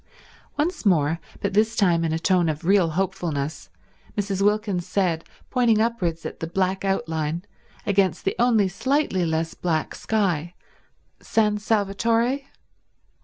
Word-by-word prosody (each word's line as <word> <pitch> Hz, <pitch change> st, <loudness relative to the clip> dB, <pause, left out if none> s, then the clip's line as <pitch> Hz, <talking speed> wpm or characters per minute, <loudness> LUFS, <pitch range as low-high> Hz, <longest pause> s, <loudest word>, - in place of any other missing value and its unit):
Once 335 Hz, +5 st, -1 dB
more, 165 Hz, -5 st, +2 dB, 0.2 s
but 200 Hz, -1 st, -1 dB
this 220 Hz, +2 st, +2 dB
time 175 Hz, -5 st, +3 dB
in 165 Hz, -, 0 dB
a 160 Hz, -, 0 dB
tone 175 Hz, 0 st, +2 dB
of 155 Hz, +2 st, -4 dB
real 190 Hz, -2 st, +4 dB
hopefulness, 175 Hz, -6 st, -2 dB, 0.5 s
Mrs. 200 Hz, -1 st, -1 dB
Wilkins 205 Hz, -3 st, +1 dB
said, 180 Hz, -4 st, 0 dB, 0.3 s
pointing 240 Hz, -4 st, +3 dB
upwards 185 Hz, -8 st, -1 dB
at -, -, -6 dB
the 165 Hz, -, -3 dB
black 190 Hz, +2 st, 0 dB
outline 165 Hz, -3 st, -1 dB, 0.4 s
against 195 Hz, -2 st, +1 dB
the 195 Hz, -, 0 dB
only 230 Hz, -5 st, +4 dB
slightly 195 Hz, -, 0 dB
less 160 Hz, 0 st, -1 dB
black 160 Hz, -3 st, -1 dB
sky, 180 Hz, -6 st, -1 dB, 0.6 s
"San 210 Hz, -2 st, +1 dB
Salvatore?" 225 Hz, +5 st, +1 dB
195 Hz, 130 wpm, -24 LUFS, 165-215 Hz, 0.6 s, real